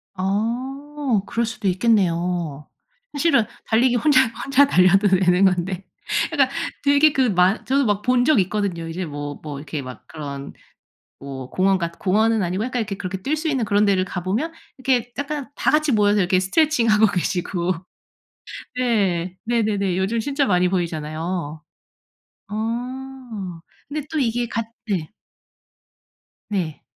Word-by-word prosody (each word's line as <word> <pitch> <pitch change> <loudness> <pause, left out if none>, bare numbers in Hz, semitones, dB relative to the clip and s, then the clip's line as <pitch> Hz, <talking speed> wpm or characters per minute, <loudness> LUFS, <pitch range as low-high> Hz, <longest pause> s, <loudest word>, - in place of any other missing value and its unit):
아 245 +6 -1
그럴 235 0 0
수도 225 -3 -4
있겠네요. 175 -7 +1 0.5
사실은 285 -7 +3 0.2
달리기 240 +2 +3
혼자 265 -1 +4 0.2
혼자 275 +1 +5
달려도 195 -1 +5
되는 190 0 +4
건데 185 0 0 0.5
그니까 280 -5 +3 0.4
되게 285 +1 +5
그 260 -2 +2
만 185 +1 +2
저도 275 0 +2
막 205 -1 +1
본 250 0 +3
적 305 -5 +4
있거든요. 185 -4 -2
이제 175 +3 -4
뭐 145 -1 -5
뭐 150 -2 -6
이렇게 150 0 -5
막 130 -1 -10
그런 140 -3 -7 0.7
뭐 135 -2 -7
공원 190 +1 +2
같 170 -1 -4
공원은 220 +3 +2
아니고 185 +4 -1
약간 250 -1 -2
이렇게 200 -2 -3
그렇게 190 0 -4
뛸 290 +9 0
수 315 +1 -2
있는 265 -6 0
그런 205 0 +3
데를 195 -2 +3
가보면 195 - -2 0.3
이렇게 250 -2 0
약간 285 -1 -4
다 - - +1
같이 305 -1 +3
모여서 210 -1 +3
이렇게 185 0 +3
스트레칭하고 230 - +3
계시고 180 -1 -1 1.0
네 195 -8 0
네네네 210 -5 0
요즘 195 +5 0
진짜 280 +4 0
많이 180 -3 +3
보이잖아요. 160 -2 -3 0.8
아 235 -3 -5 0.3
근데 295 0 -4
또 310 - 0
이게 240 -1 0
같 230 -1 -3 0.2
네. 180 -7 -1 1.4
네. 180 -7 -3
205 Hz, 285 characters per minute, -22 LUFS, 180-250 Hz, 1.4 s, 혼자